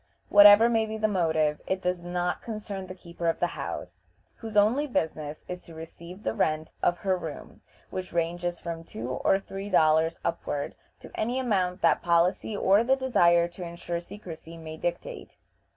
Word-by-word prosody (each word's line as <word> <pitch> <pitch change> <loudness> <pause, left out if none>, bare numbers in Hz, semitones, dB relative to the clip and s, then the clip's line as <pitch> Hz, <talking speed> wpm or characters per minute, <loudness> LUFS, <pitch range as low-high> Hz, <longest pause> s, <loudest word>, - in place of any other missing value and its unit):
Whatever 205 +2 +9
may 225 -2 +1
be 220 0 -4
the 215 0 +1
motive, 160 -6 +1
it 190 0 -1
does 180 0 -1
not 175 0 -2
concern 210 -4 -6
the 185 - -8
keeper 170 -1 -6
of 165 - +1
the - - +2
house, - - -7 0.3
whose 220 -2 -5
only 235 +9 +4
business 155 - -3
is 180 0 -6
to 165 - -14
receive 170 +4 -10
the 110 - -1
rent 155 +6 0
of 175 - +2
her 190 -1 +3
room, 160 -4 -8 0.3
which 185 0 -5
ranges 175 +1 -1
from 165 -1 -6
two 120 -6 -7
or 195 +9 +2
three 195 +1 -7
dollars 160 -2 +3
upward 145 -3 -2 0.3
to - - -12
any 240 +4 -1
amount 190 -8 0
that 165 - +4
policy 175 +5 +1
or 200 +3 +4
the 260 +3 +3
desire 175 -10 +3
to 175 +1 -9
insure 170 0 -4
secrecy 170 -3 -10
may 160 -1 -8
dictate. 175 +2 -5
175 Hz, 175 wpm, -27 LUFS, 165-205 Hz, 0.3 s, Whatever